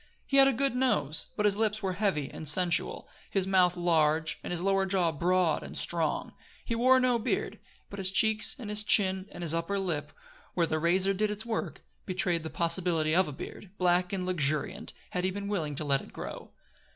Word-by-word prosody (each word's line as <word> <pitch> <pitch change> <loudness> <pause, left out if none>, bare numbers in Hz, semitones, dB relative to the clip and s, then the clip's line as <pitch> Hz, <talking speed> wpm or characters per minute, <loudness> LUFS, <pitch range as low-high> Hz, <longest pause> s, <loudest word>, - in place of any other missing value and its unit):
He 275 - 0
had 270 0 +8
a - - +4
good 270 +2 0
nose 155 - 0
but 210 - +1
his 205 -1 +3
lips 215 -1 -1
were 190 -1 -1
heavy 185 -7 -1
and 155 - -7
sensual, 175 +3 +1 0.2
his 195 -2 0
mouth 180 -2 +3
large, 160 -2 +1
and - - -6
his 175 - -1
lower 195 0 +1
jaw 185 -3 +2
broad 175 +1 +1
and - - -8
strong. - - 0 0.3
He 230 - -2
wore 255 +3 +4
no 250 -2 +2
beard, 220 - -2 0.3
but 200 - -9
his 190 -1 -1
cheeks 215 +2 +2
and 220 -6 -7
his 210 0 -1
chin 190 -2 +4
and 175 - -8
his 165 -2 +1
upper 170 +4 -1
lip, 175 -6 -3 0.4
where 170 - +2
the 155 -1 -2
razor 185 +4 +3
did 210 +2 0
its 210 +1 -4
work, 225 -1 -4 0.2
betrayed 180 -2 0
the 160 - -6
possibility 170 -2 +1
of 185 +3 +3
a - - -5
beard, 175 +7 -9
black 180 0 +2
and 190 -2 -3
luxuriant, 155 -5 0 0.2
had 180 - -2
he 185 - +1
been 200 +1 -5
willing 160 -8 -2
to 150 - -3
let 140 -1 +1
it - - -13
grow. - - -8
185 Hz, 210 wpm, -29 LUFS, 165-205 Hz, 0.4 s, had